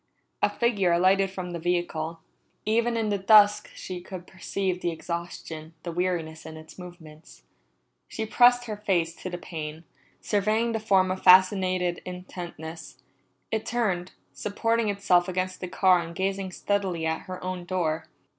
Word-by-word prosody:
A - - +4
figure 205 -7 +1
alighted 190 +3 +4
from 185 -2 -6
the 170 - -4
vehicle. 165 -1 -2 0.4
Even 235 +2 +1
in 220 -2 0
the 200 -1 0
dusk 210 +1 +6
she 180 -1 -6
could 180 0 -8
perceive 190 -1 -3
the 175 - 0
exhaustion, 165 -1 -6
the 170 - -4
weariness 165 -2 -2
in 160 0 -9
its 155 +3 -13
movements. 160 - -13 0.6
She 220 - -4
pressed 245 +2 +5
her 215 -3 -5
face 175 -5 0
to 185 - -6
the 175 - -5
pane, 160 -2 -7 0.4
surveying 215 +3 +1
the 225 - -1
form 195 -4 +3
with 185 0 -3
fascinated 185 -1 +5
intentness. 175 -3 -8 0.5
It 220 -1 0
turned, 195 -7 -1 0.2
supporting 225 +2 0
itself 185 -3 +3
against 185 0 -2
the 180 - -3
car 185 0 +4
and 170 0 -6
gazing 190 0 -2
steadily 190 -5 -1
at 160 0 -2
her 185 0 -6
own 185 -1 -4
door. 170 -4 -1
185 Hz, 155 wpm, -26 LUFS, 170-200 Hz, 0.6 s, dusk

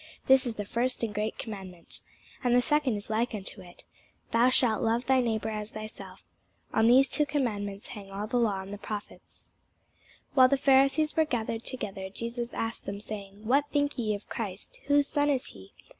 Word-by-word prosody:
This 265 -1 +5
is 230 - -3
the 205 - -4
first 240 +4 -1
and 220 -2 -1
great 210 +1 -2
commandment. 190 -7 -7 0.4
And 245 -1 +3
the 245 - +6
second 295 -5 +2
is 205 +1 -4
like 230 +2 0
unto 195 0 -4
it, 175 -1 -14 0.5
Thou 235 +2 +5
shalt 240 -4 +3
love 230 +2 +1
thy 260 0 +4
neighbour 220 -2 -1
as 210 0 -4
thyself. 215 -1 -9 0.5
On 220 0 +4
these 260 +3 +7
two 300 - +1
commandments 215 -9 -2
hang 200 -2 -9
all 200 +2 -4
the 245 +3 -1
law 210 -5 +1
and 195 +1 -8
the 205 - -6
prophets. 210 0 -8 0.8
While 260 -2 +8
the 275 - +3
Pharisees 275 +3 +4
were 320 - +5
gathered 230 -4 -2
together, 195 -6 -4
Jesus 235 +3 -4
asked 225 +1 -3
them, 200 0 -4
saying, 205 -1 -8
What 275 +5 +3
think 285 -2 +1
ye 215 -3 +1
of 205 - -10
Christ? 205 -4 -6
whose 285 0 +4
son 290 0 +1
is 270 -3 +2
he? 95 -1 -13
225 Hz, 190 wpm, -29 LUFS, 205-260 Hz, 0.8 s, While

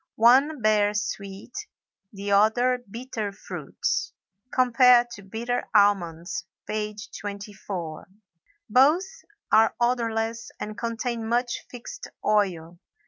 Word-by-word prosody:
One 260 +4 +5
bears 210 -1 +3
sweet, 200 +3 -7 0.6
the 200 0 -5
other 245 +5 +3
bitter 230 -2 -4
fruits 195 - -3 0.4
(comp. 250 -2 +1 0.5
Bitter 235 +3 -2
almonds, 175 -5 +2 0.2
page 210 -1 -4
24). 200 -5 -6 0.6
Both 280 - +5 0.5
are 220 +1 +5
odorless 230 -2 0
and 210 0 -5
contain 230 0 -3
much 240 +1 -1
fixed 480 - -8 0.2
oil. 175 -5 0
220 Hz, 90 wpm, -26 LUFS, 200-245 Hz, 0.6 s, One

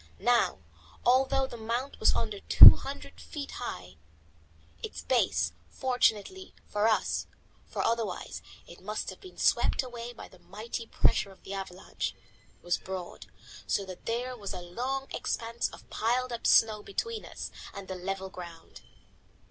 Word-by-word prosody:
Now, 240 +4 +2 0.4
although 265 +2 +4
the 240 - -8
mount 235 +5 -3
was 220 - +4
under 215 -3 -2
two - - +11
hundred - - -8
feet 290 -3 -6
high, 90 - -6 0.8
its - - -6
base, 80 - +2 0.2
fortunately 255 - 0
for 210 +1 +1
us 220 - +1 0.4
for - - -2
otherwise 230 -5 -2 0.2
it 170 - -14
must 210 +3 -3
have - - -13
been 370 -2 -13
swept - - +3
away 240 -1 -7
by 240 - -10
the 185 - -19
mighty 225 +5 -6
pressure 200 - +2
of 190 - -19
the 195 - -7
avalanche 190 -2 -5 0.5
was 175 0 0
broad, 180 - -7 0.4
so 200 - +1
that 185 -1 -10
there 245 +2 -2
was 205 -4 -6
a 180 - -5
long 255 +10 -3
expanse 230 +1 -2
of - - -14
piled 245 +3 0
up 235 - -2
snow 215 -2 +5
between 445 - -3
us - - -7 0.2
and 200 -1 -9
the 190 - -4
level 190 +1 -4
ground. 175 -3 -10
220 Hz, 150 wpm, -30 LUFS, 190-245 Hz, 0.8 s, two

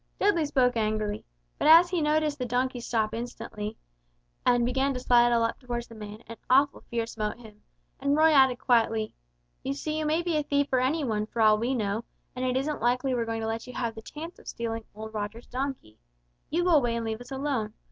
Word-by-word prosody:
Dudley 345 -7 +3
spoke 250 -3 +2
angrily, 215 -1 -1 0.4
but - - +2
as 335 +3 +8
he 355 -3 +1
noticed 300 -1 +1
the 250 - -1
donkey 250 +1 0
stop 225 -2 -1
instantly, 225 -2 -5 0.7
and 245 -1 +3
begin 265 +2 +1
to - - -2
sidle 240 -1 +4
up 230 - -1
toward 240 -2 -4
the 235 - -14
man 215 0 -9
an 230 0 -9
awful 275 +3 +4
fear 230 -1 -1
smote 215 -2 -4
him, 215 -3 -15 0.4
and 280 +1 +1
Roy 320 +1 +6
added 265 -4 +5
quietly, 225 -3 +1 0.5
"You 275 +1 -3
see 305 +2 -3
you 310 - -1
may 320 +3 +1
be 340 -3 0
a - - +2
thief 285 0 +1
or 255 - +4
any 285 +5 +1
one, 215 -4 -1
for 230 - -7
all 215 -1 +5
we 245 +4 0
know, 210 -1 -1 0.3
and 255 - -3
it 255 0 +1
isn't 290 +1 -2
likely 250 +3 +1
we're 235 -2 0
going 225 0 -3
to 220 - -2
let 225 +2 -3
you 250 - -8
have 235 -2 -2
the 220 - -9
chance 320 +9 -9
of - - -18
stealing 225 -1 -4
old 220 +1 -8
Roger's 215 +2 -5
donkey. 260 - -5 0.5
You 345 +3 +1
go 360 - +2
away 245 -7 +4
and 230 -1 -2
leave 220 +1 -3
us 245 - -11
alone. 265 -6 -2
245 Hz, 220 wpm, -27 LUFS, 225-280 Hz, 0.7 s, as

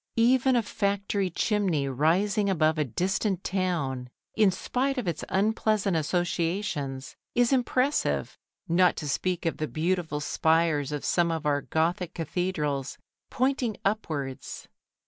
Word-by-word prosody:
Even 255 +2 +4
a 235 - +3
factory 200 -2 -1
chimney 180 -6 0
rising 190 - +2
above 155 -4 +2
a - - +3
distant 185 - -1
town, 160 -10 -1 0.3
in 215 -3 +5
spite 260 +8 -1
of 245 -7 -2
its 165 -3 -2
unpleasant 210 -1 +1
associations, 165 -4 -1 0.2
is 245 +2 +3
impressive, 260 +2 +1 0.3
not 175 +1 +4
to 150 - -5
speak 180 +5 -1
of 165 - 0
the 155 - -2
beautiful 160 -1 -1
spires 160 -1 +1
of 150 -1 -4
some 175 -1 +2
of 160 -1 -3
our 145 -1 +2
Gothic 170 +3 -1
cathedrals, 150 -5 -2 0.3
pointing 255 -4 0
upwards. 155 -10 -3
180 Hz, 125 wpm, -27 LUFS, 155-205 Hz, 0.3 s, in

